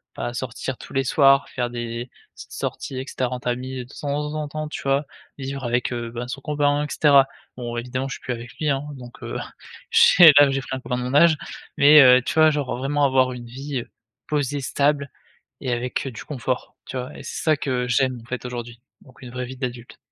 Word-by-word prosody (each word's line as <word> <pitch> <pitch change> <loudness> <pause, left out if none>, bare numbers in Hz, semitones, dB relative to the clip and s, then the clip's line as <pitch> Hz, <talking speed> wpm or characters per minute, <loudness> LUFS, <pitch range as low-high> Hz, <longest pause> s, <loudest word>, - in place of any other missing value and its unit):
pas 120 - -4
sortir 130 +1 -4
tous - - -12
les 135 - +1
soirs, 135 +1 +4
faire 120 -2 -2
des 120 0 -5 0.3
petites - - -12
sorties, 130 - -4
et 130 - -5
cetera, 130 -1 -2
en - - -6
famille, 125 +1 -3
de 130 - -17
temps 150 +1 -3
en 150 -1 -3
temps, 155 0 -4
tu - - -6
vois? 140 +2 +1 0.3
Vivre 135 0 -5
avec, 120 +1 0
heu, 120 -1 -4
ben 120 +1 -5
son 135 - -5
copain, 145 0 +1
et - - -5
cetera. 140 -3 +5 0.3
Bon, 120 -1 -5
évidemment, 125 +3 -3
je - - -4
suis - - -13
plus 130 - -5
avec 120 0 -9
lui, 155 -2 0
hein 135 0 0
donc 125 -2 -12
heu, - - -4 0.5
ch 165 -3 +8
là, 145 -1 +7
j'ai 135 0 -1
pris 130 - -5
un 130 - -9
copain 125 - -3
de 125 - -3
mon 125 +1 -3
âge, 160 +1 +6 0.4
mais 150 +2 +8
heu, 125 -1 +7
tu - - -3
vois, 155 0 +6
genre 145 -5 -2
vraiment 145 +3 0
avoir 130 -1 +3
une 120 -1 -9
vie 135 +2 -5
heu, - - -13 0.4
posée, 145 -1 -1
stable 140 +2 0 0.5
et 130 -3 -2
avec, 125 +3 -2
heu, - - -3
du - - -9
confort, 130 -3 -4
tu - - -7
vois? 125 +1 -6
Et - - -9
c'est - - -5
ça, 155 -2 +4
que 125 -3 -1
j'aime, 130 0 +1
en - - -17
fait, 125 0 -5
aujourd'hui, 120 -1 -7 0.2
donc 130 -1 -19
une 125 - -9
vraie 125 +1 -4
vie 130 +1 -8
d'adulte. 125 -2 -6
130 Hz, 235 wpm, -23 LUFS, 125-145 Hz, 0.5 s, ch